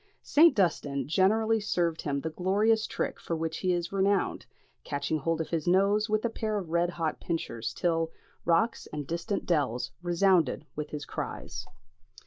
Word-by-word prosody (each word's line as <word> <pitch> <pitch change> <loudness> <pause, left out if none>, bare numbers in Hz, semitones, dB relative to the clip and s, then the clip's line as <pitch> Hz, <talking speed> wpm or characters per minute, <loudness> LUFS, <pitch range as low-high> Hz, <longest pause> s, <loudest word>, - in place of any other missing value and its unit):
St. 325 +3 +6
Dunstan 145 - 0
generally 220 +7 +3
served 170 -5 0
him 140 -2 -2
the 160 - -3
glorious 210 +6 +2
trick - - -3
for 165 - -3
which 160 0 -2
he 185 - +1
is 175 -1 -1
renowned, 195 0 +1 0.4
catching 150 +2 -2
hold 165 +3 0
of 160 - -5
his 165 -2 -2
nose 200 +4 +3
with 215 +2 +1
a - - +4
pair 215 -1 -2
of 180 -5 -5
red 170 +1 +2
hot 165 -3 -2
pincers, 120 -9 -3
till 165 +2 0 0.3
"Rocks 170 +7 +1
and 150 -1 -5
distant 170 +7 -3
dells 130 -7 0
resounded 175 -4 +2
with 150 0 -4
his 150 -1 -5
cries." - - -5
170 Hz, 165 wpm, -29 LUFS, 160-200 Hz, 0.4 s, St